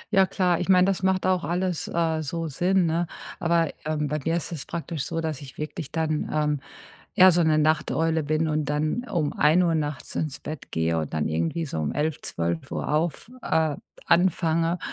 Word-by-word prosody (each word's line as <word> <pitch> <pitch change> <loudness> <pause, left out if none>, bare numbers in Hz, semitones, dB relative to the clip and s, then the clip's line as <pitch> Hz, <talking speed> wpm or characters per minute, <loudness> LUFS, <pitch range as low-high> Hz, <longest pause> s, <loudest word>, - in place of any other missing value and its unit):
Ja 190 -1 +6
klar, 180 -3 +1
ich 180 - -3
meine, 180 -1 +6
das 195 -1 0
macht 190 0 +1
auch 185 -3 +2
alles, 175 +2 -1
äh, 165 -2 0
so 165 +2 -3
Sinn, 180 +5 +2
ne? 165 +1 0 0.3
Aber, 170 -2 +2
ähm, 150 -1 -1
bei 150 - -1
mir 165 +1 +1
ist 170 -1 -3
es 160 -5 -6
praktisch 165 -3 -4
so, 165 0 -3
dass 155 -4 -3
ich 135 -2 -11
wirklich 150 -1 -5
dann, 155 -1 -1
ähm, 150 -1 +1 0.5
eher 185 -3 +8
so 175 - +3
'ne 155 -1 +3
Nachteule 155 +1 +1
bin 155 +2 0
und 155 -1 0
dann 150 - -1
um 170 -11 -1
1:00 165 +3 +3
nachts 150 -3 -3
ins 150 -3 -2
Bett 155 -2 -8
gehe 80 0 0
und 80 -2 -3
dann 80 -1 0
irgendwie 85 - -1
so 80 - -4
um 75 - -1
11, 150 0 -1
12:00 85 - -3
auf 160 +8 -1
äh, 160 -2 +1 0.3
anfange 170 -1 +2
160 Hz, 195 wpm, -25 LUFS, 150-175 Hz, 0.5 s, eher